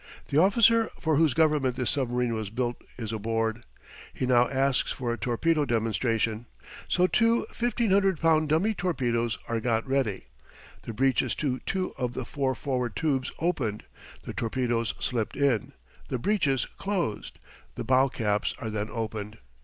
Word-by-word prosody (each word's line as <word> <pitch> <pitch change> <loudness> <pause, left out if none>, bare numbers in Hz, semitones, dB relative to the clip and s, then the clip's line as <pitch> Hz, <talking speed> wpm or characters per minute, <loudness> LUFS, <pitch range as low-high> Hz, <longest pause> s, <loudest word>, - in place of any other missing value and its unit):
The 145 - +3
officer 225 +4 +5
for 160 -3 +1
whose 155 -3 +3
government 150 -5 +2
this 125 -2 0
submarine 125 -4 0
was 110 -3 -3
built 120 +2 -3
is 115 -2 -4
aboard. 115 +1 -1 0.5
He - - -3
now 125 -1 +4
asks 135 0 +1
for 120 -2 -2
a - - -4
torpedo 150 +6 +1
demonstration. 115 -1 0 0.4
So 180 - +3
two 230 +5 +3
1,500 200 -6 +2
pound 155 -2 +3
dummy 175 +9 +2
torpedoes 120 - -1
are 115 -1 -1
got 115 +1 0
ready, 130 - 0 0.6
the 115 - -7
breeches 130 +2 +1
to 130 -4 -1
two 185 -1 -1
of 125 -2 -2
the 130 - -3
four 135 0 -1
forward 125 -5 -2
tubes 135 +1 0
opened, 130 -11 -1 0.4
the - - -6
torpedoes 115 -2 -1
slipped 115 -4 -2
in, 135 -7 +1 0.3
the 130 - -2
breeches 145 - +1
closed. 185 - -3 0.4
The - - -4
bow 130 +1 +4
caps 105 -4 -1
are 110 - -5
then 105 0 -2
opened. 110 -2 -5
130 Hz, 155 wpm, -27 LUFS, 115-155 Hz, 0.6 s, officer